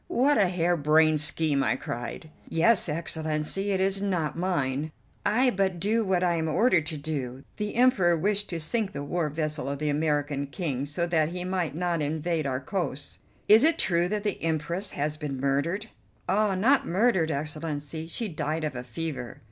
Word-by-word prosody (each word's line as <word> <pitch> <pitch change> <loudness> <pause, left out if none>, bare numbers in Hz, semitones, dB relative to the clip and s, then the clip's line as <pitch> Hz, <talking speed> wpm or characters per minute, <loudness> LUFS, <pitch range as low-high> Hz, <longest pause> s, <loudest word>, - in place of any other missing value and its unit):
"What 270 +1 +3
a 200 - +4
hairbrained 160 -3 +3
scheme!" 150 -3 +2
I - - +1
cried. 120 +6 -6 0.2
"Yes, 180 +3 +4
Excellency, 160 +4 -1
it 195 -2 +1
is 195 +1 +1
not 180 -7 -1
mine. 155 -5 -1 0.4
I 250 +4 +3
but 190 -3 0
do 220 +5 +1
what 185 -3 +1
I 175 -1 +2
am 160 0 -1
ordered 180 -3 +3
to 155 -1 -2
do. 140 -3 -4
The 210 -1 -3
Emperor 215 -9 +4
wished 205 +4 0
to 170 - -3
sink 200 +5 -2
the 140 - -4
war 160 +2 -1
vessel 155 -1 -3
of 140 - -3
the 150 +1 -1
American 145 -2 0
King 140 -3 -3
so 160 +4 -1
that 160 -3 +1
he 180 +1 -4
might 180 -4 -2
not 175 -1 -1
invade 155 +1 -1
our 130 -1 -1
coasts." 145 -1 -4 0.3
"Is 220 +4 +7
it 325 +2 +4
true 175 -1 +1
that 210 0 -2
the 205 -3 -2
Empress 165 +4 -2
has 150 +1 -2
been 145 -4 -4
murdered?" 145 +9 0 0.4
"Ah, 210 -1 +2
not 255 +9 +3
murdered, 190 -3 +2
Excellency; 155 +1 -4
she 220 +7 -4
died 155 -2 -3
of 150 -4 -3
a 125 - -5
fever." 130 0 -5
165 Hz, 180 wpm, -27 LUFS, 150-190 Hz, 0.4 s, Is